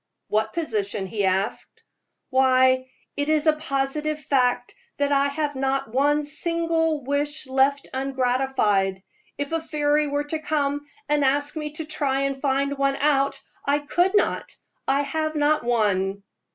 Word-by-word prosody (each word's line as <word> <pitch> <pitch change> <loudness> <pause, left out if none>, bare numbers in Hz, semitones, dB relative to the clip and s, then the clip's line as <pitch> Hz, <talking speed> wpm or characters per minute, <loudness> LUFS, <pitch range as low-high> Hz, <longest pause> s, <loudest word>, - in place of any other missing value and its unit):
"What 215 +1 0
position?" 210 - -2
he 200 +1 -1
asked. 190 +3 -2 0.5
"Why, 260 0 +4 0.3
it 285 +1 -1
is 310 0 +2
a 310 - +5
positive 300 0 -2
fact 260 -4 +1 0.2
that 285 0 +1
I 280 0 +3
have 290 0 -2
not 270 -3 -1
one 290 +3 +2
single 325 0 0
wish 290 +3 -1
left 270 +2 +1
ungratified. 250 -7 0 0.3
If 285 +1 -3
a 330 0 0
fairy 300 -1 +1
were 285 0 -1
to 310 +2 -3
come 290 -2 -1 0.2
and 295 -1 +2
ask 285 +3 +1
me 300 -1 -4
to 315 0 -4
try 280 -3 -1
and 275 -1 -2
find 275 0 0
one 275 0 +2
out, 275 -1 +1 0.2
I 285 +1 +2
could 350 +6 +1
not 410 - +1 0.4
I 275 +1 +2
have 310 +1 -2
not 300 -1 +2
one." 200 -4 0
280 Hz, 150 wpm, -24 LUFS, 260-300 Hz, 0.5 s, a